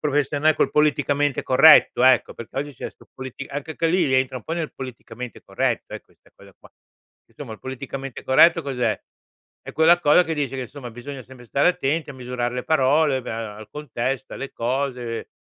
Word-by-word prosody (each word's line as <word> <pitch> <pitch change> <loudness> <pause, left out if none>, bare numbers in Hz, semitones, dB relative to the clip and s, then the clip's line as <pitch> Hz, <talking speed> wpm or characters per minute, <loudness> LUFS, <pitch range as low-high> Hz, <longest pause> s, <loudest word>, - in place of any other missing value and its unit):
professiona 145 +1 +1
col - - +1
politicamente 145 -2 +1
corretto, 135 -1 +6
ecco, 130 -1 +4
perché 115 +3 -8
oggi 145 -1 -4
c'è - - -6
sto - - -22
politica 130 +1 -8
anche 145 +2 -5
che 165 - +1
lì, 165 -5 +2
entra 130 0 +1
un 115 - -17
po' 160 - -5
nel 165 -3 -4
politicamente 125 -2 -8
corretto, - - -2
eh, - - -6
questa - - -28
cosa - - -17
qua. - - -18 0.6
Insomma, 110 - -9
il - - -18
politicamente 135 0 -7
corretto 165 +6 +5
cos'è? 125 -6 -1 0.7
È - - -7
quella 170 +2 +5
cosa 165 +3 +5
che 160 - -2
dice 135 -3 -2
che, 130 - -3
insomma, 125 -1 -9
bisogna 130 +3 -8
sempre 125 -1 -15
stare 140 +8 +2
attenti 160 -2 -1
a - - -9
misurare 125 -1 -3
le 125 - -4
parole, 140 -2 +2
beh, - - -6
uhm, 115 - -4 0.2
al 110 - -11
contesto, 135 -2 -4
alle 135 - -6
cose, 125 -1 -3
135 Hz, 190 wpm, -23 LUFS, 125-150 Hz, 0.7 s, corretto